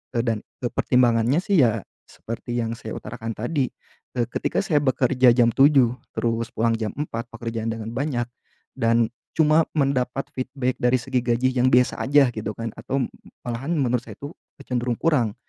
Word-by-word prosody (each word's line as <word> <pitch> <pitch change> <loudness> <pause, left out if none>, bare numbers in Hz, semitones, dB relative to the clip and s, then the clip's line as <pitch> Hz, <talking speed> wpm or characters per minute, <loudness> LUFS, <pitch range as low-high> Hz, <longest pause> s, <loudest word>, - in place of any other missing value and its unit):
eee, 115 - +2
dan, 115 -2 0 0.2
eee, 120 - -1
pertimbangannya 120 +3 +3
sih 195 -5 +2
ya, 115 -4 +2 0.2
seperti 115 +1 -6
yang 115 0 -2
saya 110 - -7
utarakan 115 0 -6
tadi, 130 +4 0 0.5
eee, 120 - +2
ketika - - -1
saya 150 -6 +2
bekerja 130 -2 +4
jam 120 -2 +4
7.00 135 -4 +5 0.2
terus 115 0 0
pulang 115 +1 +2
jam 110 -1 -2
4.00 115 -6 -4
pekerjaan 115 -1 -4
dengan 110 0 -6
banyak 125 -2 -1 0.5
dan 115 -1 +2 0.2
cuma 155 0 +4
mendapat 135 -1 0
feedback 130 -1 -2
dari 125 +1 +4
segi 125 +1 -1
gaji 125 +2 +2
yang 125 0 +3
biasa 125 0 +4
aja 135 -2 +4
gitu 110 0 -4
kan, 115 -1 -4
atau 135 0 -1 0.4
malahan 130 +8 -2
menurut 125 -4 +1
saya - - -9
itu 145 +2 -7 0.3
cenderung 120 -1 -1
kurang. 125 -10 +1
125 Hz, 165 wpm, -23 LUFS, 115-135 Hz, 0.5 s, 7.00